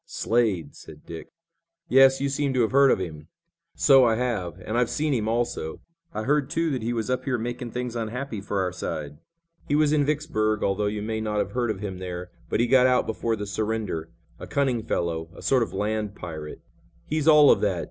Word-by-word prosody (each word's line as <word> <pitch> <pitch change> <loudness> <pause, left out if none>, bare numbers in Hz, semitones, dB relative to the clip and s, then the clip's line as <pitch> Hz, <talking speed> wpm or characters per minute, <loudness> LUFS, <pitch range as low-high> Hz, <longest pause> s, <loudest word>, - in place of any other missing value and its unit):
"Slade!" 115 - 0
said - - -13
Dick. 80 -1 -8 0.6
"Yes, 135 -2 +6
you 140 - 0
seem 140 -1 -1
to 125 - +3
have 110 - +1
heard 140 +1 +6
of - - +4
him?" 80 -5 -6 0.5
"So 135 -1 +6
I 115 -2 +3
have, 110 -9 -2
and 110 - -3
I've 120 -1 +2
seen 150 -1 0
him, 110 -4 -1
also. 115 -8 -2 0.3
I 110 - -4
heard, 145 +2 +1
too, 165 -1 0
that 130 -4 -2
he 115 +2 -2
was 115 +1 -2
up 130 0 -1
here 130 -2 0
making 120 +1 -4
things 125 0 -4
unhappy 115 0 -4
for 100 0 -2
our 90 -1 -1
side. 75 -4 -5 0.5
He 145 - +1
was 150 0 +3
in 150 -1 +3
Vicksburg, 140 -8 0
although 100 +1 +1
you 105 0 -3
may 110 0 -2
not 105 -1 -2
have - - -1
heard 120 -2 -1
of 105 -3 -3
him 95 -3 -5
there, 90 -1 -6 0.2
but - - 0
he 120 - +4
got 130 +1 +5
out 125 -1 +3
before 115 +1 -1
the 105 -1 -5
surrender. 105 -6 -3 0.3
A - - -8
cunning 130 -5 0
fellow. 85 -6 -2
A - - -11
sort 130 -2 +3
of 115 - -1
land 105 +1 -2
pirate." 80 -5 -8 0.4
"He's 155 0 -1
all 150 -2 +8
of - - +3
that. - - +1
115 Hz, 220 wpm, -25 LUFS, 100-130 Hz, 0.6 s, all